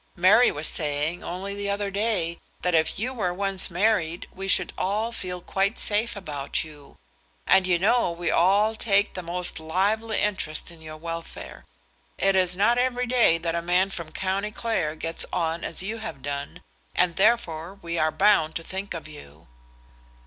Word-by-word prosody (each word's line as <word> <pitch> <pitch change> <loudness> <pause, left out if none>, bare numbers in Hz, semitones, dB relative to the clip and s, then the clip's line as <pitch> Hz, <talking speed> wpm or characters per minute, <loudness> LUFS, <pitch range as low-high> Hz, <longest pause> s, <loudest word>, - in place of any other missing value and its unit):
Mary 195 +8 +6
was 150 +2 -2
saying, 150 +2 -2
only 190 +3 -5
the 200 0 -3
other 200 0 -1
day, 195 -5 -1 0.2
that 180 - +1
if 160 -1 +2
you 245 +6 -2
were 200 -8 -1
once 195 +1 +2
married, 175 -3 0
we 195 +1 -6
should - - +3
all 215 +5 -1
feel 180 -5 -5
quite 195 +4 0
safe 220 +3 +1
about 150 -8 -3
you. 150 -3 -14 0.5
And 190 -1 +4
you 180 -1 +3
know 215 +4 +3
we 170 +1 -2
all 200 +5 +4
take 205 -2 +2
the 185 - -5
most 180 0 -4
lively 205 +8 0
interest 190 -7 -1
in 165 -1 -14
your 155 0 -9
welfare. 165 +1 -7 0.5
It 195 0 +2
is 180 -1 +2
not 235 +5 +3
every 250 0 +1
day 240 -9 +4
that 165 0 -2
a 170 - -1
man 180 +3 +2
from 170 -4 -6
County 195 +4 -2
Clare 210 -9 -2
gets 165 +1 0
on 165 -1 -1
as 165 - 0
you 220 +4 -3
have 220 -12 -7
done, 145 +5 -5 0.3
and 175 -1 +2
therefore 190 -5 +1
we 170 -1 -3
are 155 0 +2
bound 160 -6 +3
to 165 - -4
think 190 +1 -5
of 160 - -7
you." 80 - -13
185 Hz, 180 wpm, -25 LUFS, 165-205 Hz, 0.5 s, Mary